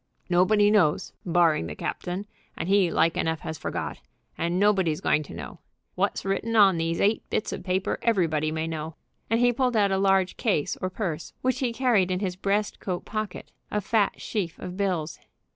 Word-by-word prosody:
Nobody 205 +4 +4
knows, 180 -8 +2
barring 165 - +3
the 75 - -6
captain, 180 +3 -4 0.3
and - - -3
he 195 -2 +4
like 165 0 +2
enough 160 -1 -1
has 160 -2 -6
forgot, - - -4 0.4
and 170 +2 -1
nobody's 190 -6 +2
going 150 - +2
to 145 - -10
know. 75 -6 -8 0.3
What's - - -1
written 195 +4 -1
on 195 -5 +6
these 165 +1 -1
eight 210 +2 +2
bits - - -1
of - - -6
paper 185 +1 -1
everybody 165 -9 +1
may 160 0 -2
know," 160 -1 -5 0.3
and 225 +1 +2
he 245 0 +4
pulled 250 -1 +1
out 200 -2 +3
of 190 - +2
a 195 - 0
large 195 -1 +2
case 185 - 0
or 185 - -1
purse, 175 -5 -4
which 255 0 +1
he 255 -3 0
carried 230 -7 +2
in 180 0 0
his 185 -3 -2
breast 200 +2 -1
coat 180 -2 -4
pocket, 215 -3 -5 0.2
a 210 - 0
fat 210 +1 +1
sheaf 185 -7 -3
of 180 0 -7
bills. 180 -6 -2
190 Hz, 195 wpm, -26 LUFS, 165-210 Hz, 0.4 s, on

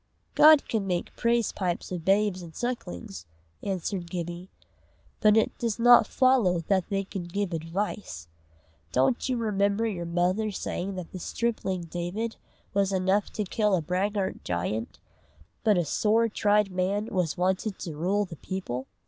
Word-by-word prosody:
"God 310 -1 +7
can 215 -4 -1
make 175 -2 -2
praise 235 -1 +1
pipes 180 -2 -3
of 175 -3 -4
babes 195 0 +2
and 165 -2 -11
sucklings," 95 - -5 0.3
answered 190 -2 -3
Gibbie; 175 +1 -5 0.7
"but 215 0 +5
it 220 - +2
does 230 -3 -1
not 240 +1 +7
follow 240 -10 +3
that 185 +1 0
they 195 -1 0
can 190 -2 -6
give 190 +1 -2
advice. 165 - -4 0.6
Don't 135 - +1
you 255 - +1
remember 205 -1 +1
your 180 -6 -3
mother 180 +5 +1
saying 195 -1 -4
that 180 -2 -7
the 185 - -7
stripling 195 -3 -2
David 175 +7 -4 0.4
was 200 -1 +2
enough 190 +2 +1
to 210 - -1
kill 210 +1 +1
a 175 - 0
braggart 190 +4 -1
giant, 90 +6 -3 0.7
but 210 -3 +4
a 175 - +1
sore 220 +8 +2
tried 210 -2 +2
man 190 +3 0
was 180 -5 0
wanted 190 +3 0
to 165 -4 -6
rule 195 +6 +1
the 170 -4 -10
people?" 135 -10 -5
190 Hz, 155 wpm, -27 LUFS, 175-210 Hz, 0.7 s, God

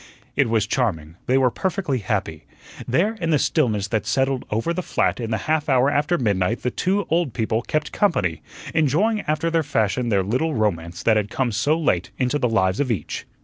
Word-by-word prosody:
It - - +2
was 110 -2 +2
charming; 85 - -2
they 130 - +3
were 130 -2 +3
perfectly 180 - -1
happy. 95 -7 -3 0.4
There 175 - +2
in 165 - 0
the 155 - +4
stillness 110 - +1
that 110 -1 -1
settled 135 -1 0
over 115 +11 -1
the 185 - -2
flat - - 0
in 115 -2 -3
the 110 - 0
half 155 -1 0
hour 130 +1 +4
after 150 +5 +1
midnight 105 - 0
the 125 - 0
two 195 +2 0
old 165 -7 +1
people 110 -1 0
"kept 150 +4 -2
company," 100 - 0 0.3
enjoying 165 - +2
after 155 +2 0
their 165 0 +2
fashion 125 -4 0
their 100 -3 +2
little 130 - 0
romance 85 -6 -1
that 110 -1 +4
had 105 -1 -1
come 125 0 -1
so 145 +9 +1
late 95 - 0
into 130 +3 0
the 125 - +1
lives 95 -3 +1
of 145 -2 0
each. 100 -10 -3
125 Hz, 200 wpm, -22 LUFS, 105-155 Hz, 0.4 s, the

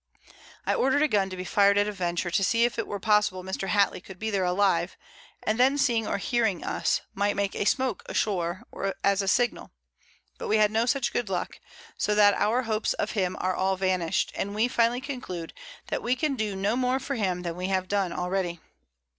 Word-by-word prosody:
I - - +2
order'd 270 +3 +2
a - - +4
Gun 200 -6 +1
to 185 - -7
be 180 - -4
fir'd 200 +3 +4
at 205 0 +3
a - - -1
venture, 175 -2 -2
to 195 - +2
see 230 +5 +3
if 240 -1 -2
it 230 - -2
were 205 - -4
possible 210 -3 +2
Mr. 190 +1 -4
Hattley 200 -3 +2
could 190 - -11
be 220 +3 -3
there 195 -2 +1
alive, 180 -1 +1 0.5
and 215 +2 0
then 265 +3 +4
seeing 235 -6 +1
or - - -1
hearing 220 -3 0
us, - - 0
might 205 +1 0
make 200 0 -1
a - - -2
Smoak 255 -2 +1
a - - -6
shore, 180 -3 -1 0.4
as 200 0 +3
a 195 - -3
Signal, 245 +4 +1 0.7
but - - -4
we 215 - +3
had 210 -1 +4
no 225 +2 +1
such 270 0 0
good 235 -5 -1
Luck; 185 - -3 0.4
so 210 - +1
that 205 -1 +6
our 230 +6 +1
Hopes 220 -2 0
of - - -2
him 185 -4 -1
are 185 0 0
all 190 +1 +1
vanish'd, 185 -3 0
and 200 +1 -3
we 220 +3 +2
finally 240 +1 +1
conclude, 245 - -6 0.4
that - - -2
we 245 +2 +1
can 295 +1 -1
do 215 -5 -2
no 200 +4 0
more 255 +1 +1
for 270 +1 -4
him 185 -7 -1
than 170 -1 -3
we 180 +1 -3
have 190 -1 0
done 195 -2 0
already. 180 -1 -2
205 Hz, 220 wpm, -27 LUFS, 185-230 Hz, 0.7 s, that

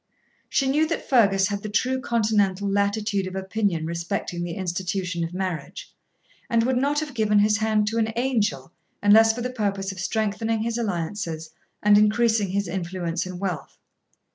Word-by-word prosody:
She 270 - +1
knew 300 +4 +2
that 330 - -3
Fergus 200 -6 +4
had 200 -1 -3
the 215 - -5
true 255 +5 0
continental 210 -5 +1
latitude 200 0 0
of 185 - -7
opinion 190 -3 -1
respecting 170 +2 -3
the 170 -1 -4
institution 185 -1 -2
of 165 - -4
marriage, 180 -5 -5 0.6
and 230 -1 +3
would 255 +1 +1
not 285 +3 +1
have 300 -3 -6
given 215 -3 +2
his 210 +1 +4
hand 215 -1 +1
to 230 +1 -1
an 220 0 +1
angel 215 - 0 0.3
unless 220 +2 +7
for 235 +2 -5
the 250 +1 -3
purpose 200 -5 -2
of 190 - -9
strengthening 220 +2 -1
his 235 +1 -2
alliances 165 -5 -3 0.3
and 205 0 +6
increasing 220 0 +3
his 200 +1 -1
influence 175 -1 -3
and 180 -1 -7
wealth. 180 -6 -4
205 Hz, 165 wpm, -24 LUFS, 185-225 Hz, 0.6 s, unless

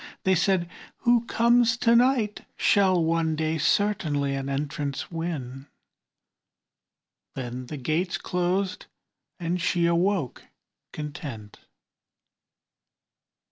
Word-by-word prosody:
They 190 - +3
said, 180 0 +2 0.3
"Who 240 -1 +3
comes 235 0 +3
to 235 -1 +3
night 240 -4 +2
Shall 190 -4 +3
one 160 -1 +1
day 160 +1 -1
certainly 150 -7 +1
an 135 0 -3
entrance 140 +1 -3
win;" 145 -6 -5 1.7
Then 125 -1 -5
the 150 - -6
gate 155 +7 -1
closed 180 +2 -1 0.5
and 175 +1 -2
she 170 0 +1
awoke 170 - 0 0.5
content. 140 -8 -7
170 Hz, 95 wpm, -26 LUFS, 145-195 Hz, 1.7 s, They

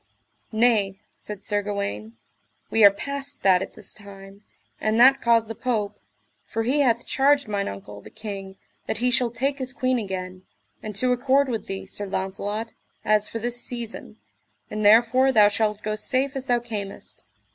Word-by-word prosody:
Nay, 220 -4 +2 0.2
said 210 -1 -9
Sir 205 -1 0
Gawaine, 115 - -4 0.5
we 225 - +4
are 200 - +11
past 280 +7 -6
that 185 -2 +5
at - - -6
this - - -5
time, 200 -1 -13 0.4
and 215 +1 +1
that 265 +3 +7
caused 230 -1 +3
the 225 - -5
Pope, 210 -5 -2 0.4
for 225 - -3
he 265 +6 +1
hath 240 -4 +2
charged 280 0 +2
mine 200 -1 -1
uncle, 100 +1 -8
the - - -13
king, 200 -3 -7 0.3
that - - -1
he 250 +2 +1
shall 245 -1 +2
take 270 +4 -2
his 260 0 -3
queen 255 -2 +1
again, 185 -3 -5 0.4
and 215 -1 -7
to 250 +5 +2
accord 265 +2 +2
with 225 -3 -3
thee, 195 0 -5
Sir 205 - -5
Launcelot, 200 +4 -3 0.3
as 215 0 +3
for - - -4
this 240 +1 -2
season, 235 -2 -6 0.5
and 215 0 -3
therefore 235 +5 +5
thou 210 -4 +6
shalt 210 0 -1
go 215 0 -1
safe 260 +5 0
as 270 0 -4
thou 245 - +3
camest. 215 -4 -7
220 Hz, 175 wpm, -24 LUFS, 200-250 Hz, 0.5 s, are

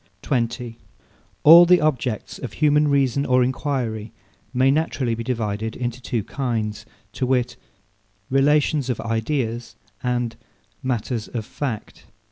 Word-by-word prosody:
20. 120 -2 -2 0.6
All 165 +3 +10
the 180 0 +6
objects 130 -7 -1
of 125 - -6
human 150 0 +3
reason 140 -1 +2
or 130 -2 +3
enquiry 125 -5 -2 0.4
may 130 +1 +3
naturally 140 -5 0
be 115 +1 -4
divided 110 -2 -2
into 125 0 -4
two 120 -4 -2
kinds, 115 -6 -3 0.2
to 130 - -2
wit, 125 -2 +1 0.7
Relations 140 0 +2
of 125 - -1
Ideas, 115 0 -2 0.3
and 120 -2 -1 0.5
Matters 120 -2 -2
of 115 -3 -5
Fact. 125 -3 -6
125 Hz, 120 wpm, -22 LUFS, 115-140 Hz, 0.7 s, All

